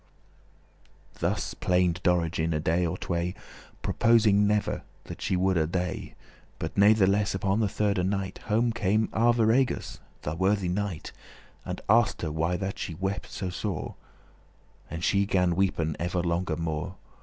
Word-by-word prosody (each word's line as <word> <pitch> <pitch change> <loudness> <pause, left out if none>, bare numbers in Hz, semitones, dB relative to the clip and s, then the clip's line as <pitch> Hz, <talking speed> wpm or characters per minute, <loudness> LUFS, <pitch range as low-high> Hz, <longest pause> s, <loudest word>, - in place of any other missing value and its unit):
<28> - - -19
Thus - - -1
plained 90 -1 +1
Dorigen 85 -2 +1
a - - 0
day 85 +3 +1
or 85 +3 -3
tway, 85 0 -2 0.5
Purposing 105 -3 +4
ever 105 0 0 0.2
that - - -9
she - - 0
woulde 90 -4 +1
dey;* 90 0 0
*die - - -11 0.4
But - - -5
natheless 100 -1 +4
upon 95 +2 0
the 110 - +2
thirde 100 -2 0
night 95 0 -2
Home 115 +2 +2
came 110 -1 +1
Arviragus, 120 +2 +2 0.2
the 75 - -2
worthy 95 +2 +1
knight, 95 -3 -3 0.5
And - - -5
asked 110 -2 +3
her 80 - -1
why 85 +3 0
that 95 0 -4
she 85 - -4
wept 95 +3 -3
so 95 -2 -4
sore. 100 +2 -4 1.0
And 85 +1 -5
she 100 +1 +2
gan 90 -3 +2
weepen 85 -5 0
ever 90 +1 -1
longer 85 -1 -1
more. 85 +2 -3
95 Hz, 150 wpm, -27 LUFS, 85-105 Hz, 1.0 s, Purposing